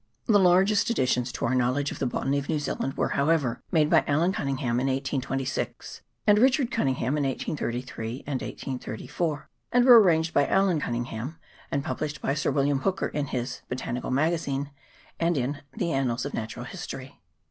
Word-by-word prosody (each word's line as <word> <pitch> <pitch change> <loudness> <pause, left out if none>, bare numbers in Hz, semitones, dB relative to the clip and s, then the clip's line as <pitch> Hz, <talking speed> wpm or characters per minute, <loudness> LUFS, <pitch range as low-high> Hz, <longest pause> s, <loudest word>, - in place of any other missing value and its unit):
The 210 -3 +5
largest 195 +4 +4
additions 125 - +1
to - - -2
our 120 - +1
knowledge 130 +3 +1
of - - -7
the 135 - 0
botany 135 +3 0
of 140 - -7
New 155 - +1
Zealand 135 -2 -3
were, - - +1
however, 140 -4 +1
made 155 -3 +4
by - - +4
Allan 165 +6 +2
Cunningham 130 -6 -1
in 130 - 0
1826, 135 0 -3 0.2
and 210 0 +5
Richard 260 +1 +3
Cunningham 135 - 0
in - - +1
1833 125 -3 -3
and 140 -3 -2
1834, 140 +5 -4 0.2
and 245 0 +4
were 245 -3 +10
arranged 160 -4 +2
by 145 - +3
Allan 190 -4 +3
Cunningham, 120 +3 -4 0.3
and 140 - -1
published 155 -2 -3
by 135 - 0
Sir 145 - 0
William 140 0 +2
Hooker 190 +7 -1
in 145 -1 -2
his 125 0 -4
' - - -40
Botanical 125 -1 -3
Magazine 145 -1 0 0.2
' - - -28
and 170 -1 +1
in 140 +3 -2
' 135 - -43
The 170 - 0
Annals 130 -3 0
of 140 - -5
Natural 110 -1 -5
History.' - - -8
140 Hz, 180 wpm, -27 LUFS, 130-165 Hz, 0.3 s, were